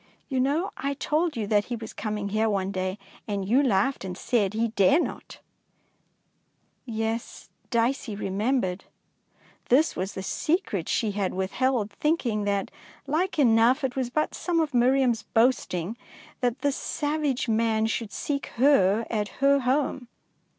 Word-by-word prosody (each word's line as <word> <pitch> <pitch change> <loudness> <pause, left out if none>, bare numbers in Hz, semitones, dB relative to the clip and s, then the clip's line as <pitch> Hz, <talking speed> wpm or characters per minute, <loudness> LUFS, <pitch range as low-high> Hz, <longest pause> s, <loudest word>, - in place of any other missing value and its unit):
You 265 -2 0
know 295 +9 +1
I 280 +1 -2
told 305 +1 0
you 220 - -1
that 205 0 +2
he 245 - -3
was 225 -1 -8
coming 210 -2 -3
here 220 +2 +1
one 195 -2 -1
day, 185 0 -2 0.3
and 200 -2 -2
you 250 +7 +4
laughed 250 -1 +1
and 180 -2 -5
said 210 -4 0
he 230 +1 +1
dare 210 - +4
not! - - -5 1.5
Yes, 225 0 -4 0.2
Dicey 235 -1 0
remembered. 195 -1 -1 0.8
This 290 +6 +4
was 190 +2 -3
the 190 - -4
secret 300 - -1
she 220 -3 +1
had 195 -2 -2
withheld, 215 +3 0
thinking 235 -5 0
that, 200 -1 -1 0.3
like 325 +7 -1
enough, 245 +1 +4
it 255 -2 -1
was 260 -3 -1
but 305 +5 -1
some 345 -2 -1
of 310 -3 0
Miriam's 250 -1 +3
boasting 225 -5 +1 0.4
that 245 +1 -1
this 285 -2 +1
savage 295 -4 -1
man 220 -1 +2
should 225 -1 -2
seek 280 -1 -3
her 230 -5 +4
at 210 -3 -1
her 280 +1 +4
home. 265 -1 0
230 Hz, 150 wpm, -26 LUFS, 205-275 Hz, 1.5 s, you